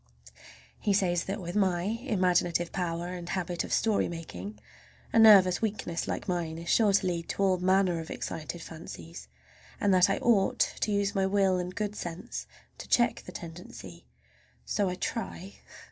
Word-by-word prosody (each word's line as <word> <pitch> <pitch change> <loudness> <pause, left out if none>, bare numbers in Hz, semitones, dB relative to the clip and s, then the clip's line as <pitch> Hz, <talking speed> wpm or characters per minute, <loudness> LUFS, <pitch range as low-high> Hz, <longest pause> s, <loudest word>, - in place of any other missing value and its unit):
He 205 - +1
says 175 -3 +1
that 195 +3 -3
with 175 0 -6
my 185 -4 +2
imaginative 185 -6 +1
power 175 -1 -2
and 175 -1 -6
habit 175 -2 -2
of - - -8
story 220 -3 +2
making 170 +5 -7 0.6
a 230 - +5
nervous 195 -5 +7
weakness 205 -6 -2
like - - -3
mine 170 -3 -2
is 170 0 -7
sure 215 -3 +4
to 195 0 +3
lead 170 -2 -2
to 200 - -1
all 185 -2 +3
manner 185 -1 +2
of 160 - -7
excited 165 +1 -5
fancies, 85 - -9 0.5
and 200 -1 +3
that 185 0 +5
I 195 - +1
ought 210 -5 +2 0.2
to 215 - 0
use 200 0 +1
my 195 -2 +1
will 190 -2 +2
and 180 +1 -5
good 210 -1 -2
sense 175 -1 -6 0.3
to - - -8
check 240 -1 +2
the - - -6
tendency. 165 - -10 0.6
So 200 -2 0
I 180 - -3
try. 195 -2 -5
185 Hz, 170 wpm, -29 LUFS, 170-200 Hz, 0.6 s, nervous